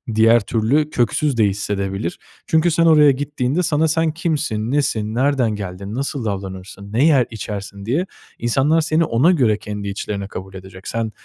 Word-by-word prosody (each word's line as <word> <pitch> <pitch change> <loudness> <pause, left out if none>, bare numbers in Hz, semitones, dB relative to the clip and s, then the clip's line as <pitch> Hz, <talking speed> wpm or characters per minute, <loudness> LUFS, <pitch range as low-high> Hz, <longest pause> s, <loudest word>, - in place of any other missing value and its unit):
diğer 115 +2 +5
türlü 120 +9 +1
köksüz 130 +1 0
de 110 - +4
hissedebilir. 100 - -2 0.3
Çünkü 160 +1 +3
sen 165 +1 +2
oraya 150 -3 +6
gittiğinde 145 +3 -1
sana 160 -1 +2
sen 160 +1 +1
kimsin 150 - -2
nesin, 110 -7 0
nereden 130 -2 +2
geldin, 100 +1 -6
nasıl 135 -1 -3
davranırsın, 100 0 -6
ne 130 +7 +3
yer, 140 -6 +4
içersin 100 -2 -6
diye 145 - 0 0.3
insanlar 135 +7 +2
seni 155 +1 +1
ona 140 +10 +3
göre 120 - +2
kendi 105 -1 -6
içlerine 100 0 -4
kabul 95 -1 -8
edecek. 95 0 -11
Sen 115 -1 -2
115 Hz, 160 wpm, -20 LUFS, 100-150 Hz, 0.3 s, oraya